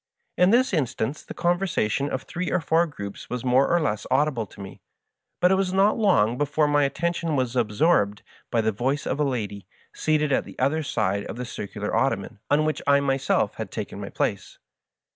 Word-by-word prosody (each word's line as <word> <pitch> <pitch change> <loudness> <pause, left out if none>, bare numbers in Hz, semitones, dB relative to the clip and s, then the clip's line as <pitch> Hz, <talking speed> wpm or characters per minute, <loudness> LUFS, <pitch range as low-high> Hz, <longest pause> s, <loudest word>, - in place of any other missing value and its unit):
In 180 +1 +4
this 245 +1 +3
instance 135 -3 -1
the - - -9
conversation 170 - 0
of 130 - -3
three 180 +1 -4
or 185 - +2
four 165 +1 +2
groups 100 -9 -8
was 125 0 -4
more 130 +2 +4
or 175 - +3
less 110 -10 -2
audible 130 -4 +1
to - - -17
me; 95 -1 -9 0.6
but 180 - +4
it - - +6
was 190 -1 +1
not 195 +2 +4
long 125 - +2
before 145 +1 +2
my 145 -1 +3
attention 165 +2 -1
was 130 -2 -1
absorbed 105 -2 +2 0.3
by 115 - +1
the 110 0 +1
voice 130 +7 -1
of 140 - -2
a - - +3
lady, 105 -8 -3 0.3
seated 150 -2 +1
at - - +2
the - - -13
other 140 +5 +1
side 100 -8 -1
of - - -6
the 125 - -5
circxdar 105 -3 -5
ottoman 110 -5 0
on 150 +2 +3
which 155 -2 -1
I 140 0 +5
my 135 -1 +1
self 135 - 0
had - - -5
taken - - -6
my - - -6
place. - - -3
140 Hz, 200 wpm, -25 LUFS, 115-160 Hz, 0.6 s, it